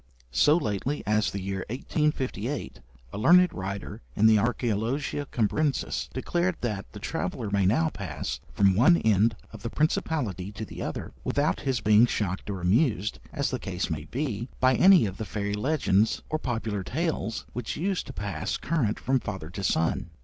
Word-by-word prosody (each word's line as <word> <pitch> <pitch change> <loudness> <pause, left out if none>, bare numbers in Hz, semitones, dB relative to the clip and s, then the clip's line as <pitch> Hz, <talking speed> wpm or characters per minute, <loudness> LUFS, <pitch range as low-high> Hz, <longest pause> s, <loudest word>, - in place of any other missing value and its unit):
So 150 - +5
lately 120 - -2
as 105 0 +2
the 100 - -4
year 95 0 -3
1858, 130 -1 -2 0.3
a - - -4
learned 180 +9 +6
writer 95 +1 -5
in 110 - +3
the 110 -1 +7
'Archæologia 125 +5 -1
Cambrensis' 135 +6 0
declared 175 +7 0
that 105 -5 -3
'the - - -10
traveller 105 - -3
may 100 -2 +3
now 160 +11 +3
pass 100 - -5
from 100 -1 +4
one 155 - +6
end 110 - +3 0.2
of 110 - -9
the 115 - -3
Principality 120 - -1
to 110 - -5
the - - -8
other, - - -5
without 145 +2 +1
his 135 -3 -1
being 105 +3 +6
shocked 100 -3 -2
or 95 -3 -3
amused, 105 - +1
as 140 - -1
the 130 - -2
case 95 -3 -3
may 75 -1 -3
be, 120 - -3
by 130 0 +4
any 185 -1 +7
of 95 -2 -4
the - - -3
fairy 100 0 -3
legends 110 -3 +1
or 155 - 0
popular 110 -6 -2
tales 125 - -2
which 120 -2 -4
used 190 +3 -1
to - - -6
pass 100 -9 -3
current 140 -10 0
from 130 +1 +1
father 95 -8 -6
to 100 +2 -6
son.' 80 -1 0
110 Hz, 170 wpm, -27 LUFS, 100-140 Hz, 0.3 s, the